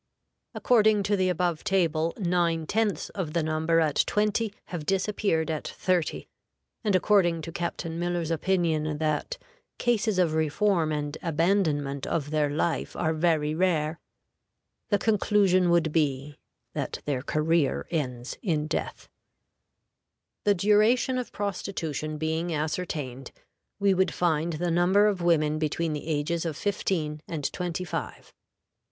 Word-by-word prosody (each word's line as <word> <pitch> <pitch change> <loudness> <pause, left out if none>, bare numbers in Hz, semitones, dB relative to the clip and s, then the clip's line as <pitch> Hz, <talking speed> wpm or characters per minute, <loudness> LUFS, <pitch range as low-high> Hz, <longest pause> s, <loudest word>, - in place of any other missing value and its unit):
According 215 -4 +3
to 205 +1 +1
the 185 -1 +1
above 175 -2 -1
table, 165 -4 +1
nine 170 -4 +1
tenths 220 +3 0
of 165 -6 -4
the 170 - +1
number 160 +1 +1
at 155 -3 +2
twenty 210 +1 +1 0.2
have 165 -3 -3
disappeared 190 -2 0
at 155 - -3
thirty, 180 -3 -1 0.6
and 205 -3 +2
according 175 -4 +3
to 165 - -6
Captain 170 -1 -4
Miller's 175 -2 -1
opinion 160 -3 0
that 155 - -1 0.4
"cases 225 -4 +1
of 175 -4 +2
reform 160 +2 +1
and 145 0 -3
abandonment 155 -5 0
of 145 -3 -2
their 150 -2 +1
life 155 +1 -1
are 160 -2 0
very 155 -2 +1
rare," 160 -2 0 0.9
the 205 - +3
conclusion 200 -4 +3
would 170 -2 +3
be 145 -2 -1 0.3
that - - -3
their 140 -3 -1
career 155 +2 +1
ends 125 -6 -3
in 160 -8 0
death. 155 - -4 1.4
The 205 -1 +4
duration 215 +7 +3
of 250 - -5
prostitution 165 -7 -3
being 160 +2 -1
ascertained, 150 -4 -3 0.5
we 200 -1 +3
would 190 0 +2
find 170 -1 0
the 170 +2 -1
number 180 +4 +4
of 200 -4 +1
women 155 -3 +2
between 155 +1 -1
the 150 +1 -5
ages 160 +2 -1
of 160 -3 -3
fifteen 165 -7 -1
and 150 -4 -3
twenty 180 0 -3
five. 180 - -6
165 Hz, 135 wpm, -27 LUFS, 155-190 Hz, 1.4 s, The